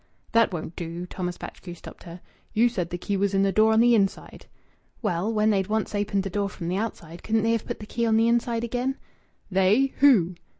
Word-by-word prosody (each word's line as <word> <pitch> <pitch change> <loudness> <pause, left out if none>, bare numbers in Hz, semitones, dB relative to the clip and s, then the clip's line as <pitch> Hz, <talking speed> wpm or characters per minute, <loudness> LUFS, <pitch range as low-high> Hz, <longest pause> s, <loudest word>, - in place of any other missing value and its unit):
"That 230 -2 +4
won't 170 -1 -6
do," 170 +1 -5
Thomas 180 -1 -5
Batchgrew 175 -2 -9
stopped - - -13
her. 170 +1 -10 0.3
"You 230 +2 +4
said 180 -7 -3
the 175 - -4
key 200 +3 -3
was 200 0 0
in 195 - +3
the 195 - +2
door 220 +2 +4
on 220 - +4
the 240 +1 +5
inside." 200 -4 -1 0.6
"Well, 195 +1 0
when 215 0 +2
they'd 195 -2 +1
once 220 0 -1
opened 205 -1 0
the 195 - -4
door 200 +1 -1
from 170 -3 -6
the 185 - -1
outside, 175 -6 -5
couldn't 220 -1 0
they 225 - +2
have 230 -1 -1
put - - -4
the 210 - -8
key 235 +2 -1
on 220 -1 +3
the 225 +1 +3
inside 235 0 +1
again?" 250 +3 -2 0.5
"They? 200 +9 +3
Who?" 220 -11 +5
205 Hz, 225 wpm, -25 LUFS, 180-230 Hz, 0.6 s, the